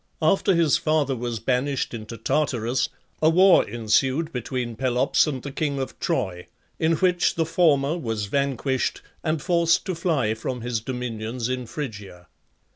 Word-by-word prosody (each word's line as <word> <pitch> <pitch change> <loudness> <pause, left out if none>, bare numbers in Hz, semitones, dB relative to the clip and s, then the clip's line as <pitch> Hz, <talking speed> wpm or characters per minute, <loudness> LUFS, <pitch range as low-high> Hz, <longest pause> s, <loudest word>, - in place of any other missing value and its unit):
After 185 +4 +3
his 165 -5 +4
father 150 -4 +1
was 120 -1 -3
banished 130 +4 -1
into 115 0 -7
Tartarus, 125 -1 0 0.3
a 155 - +5
war 185 +3 +6
ensued 130 +8 +1
between 125 -1 -3
Pelops 130 +5 +2
and 135 -4 -3
the 140 - -5
king 140 0 -2
of 135 - -5
Troy, 90 -1 -2 0.3
in 160 +1 +2
which 180 +1 +2
the 165 - +1
former 155 -3 +2
was 115 -7 -2
vanquished 135 +2 -1 0.2
and 155 -1 0
forced 170 -2 +2
to 185 - -2
fly 155 -10 0
from 120 +2 -4
his 120 -1 -2
dominions 120 0 -4
in 125 -1 -3
Phrygia. 105 - -7
130 Hz, 150 wpm, -24 LUFS, 115-155 Hz, 0.3 s, war